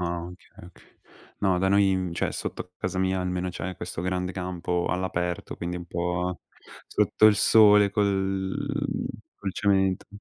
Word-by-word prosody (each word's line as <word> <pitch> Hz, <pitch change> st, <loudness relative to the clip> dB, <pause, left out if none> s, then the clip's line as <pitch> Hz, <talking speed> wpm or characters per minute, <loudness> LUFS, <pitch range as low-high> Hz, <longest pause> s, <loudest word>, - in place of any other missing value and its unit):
Ah, 85 Hz, -1 st, -2 dB
okay, 90 Hz, -1 st, -15 dB
okay. -, -, -21 dB, 0.6 s
No, 95 Hz, -3 st, +2 dB
da 95 Hz, +1 st, +2 dB
noi 95 Hz, -2 st, +2 dB
cioè -, -, -1 dB
sotto 90 Hz, -, -5 dB
casa 95 Hz, 0 st, -3 dB
mia 95 Hz, 0 st, +1 dB
almeno 90 Hz, 0 st, -2 dB
c'è 90 Hz, +1 st, -5 dB
questo 85 Hz, -1 st, -5 dB
grande 90 Hz, 0 st, -1 dB
campo 90 Hz, -1 st, -2 dB
all'aperto, 90 Hz, -1 st, -2 dB
quindi 85 Hz, +1 st, -4 dB
un 85 Hz, -, -7 dB
po' 90 Hz, +1 st, -2 dB, 0.5 s
sotto 110 Hz, -, +3 dB
il 105 Hz, -, +6 dB
sole, 105 Hz, -1 st, +6 dB
col 100 Hz, +9 st, -1 dB, 0.3 s
col 95 Hz, -2 st, -5 dB
cemento. 95 Hz, -2 st, +1 dB
95 Hz, 145 wpm, -26 LUFS, 90-95 Hz, 0.6 s, il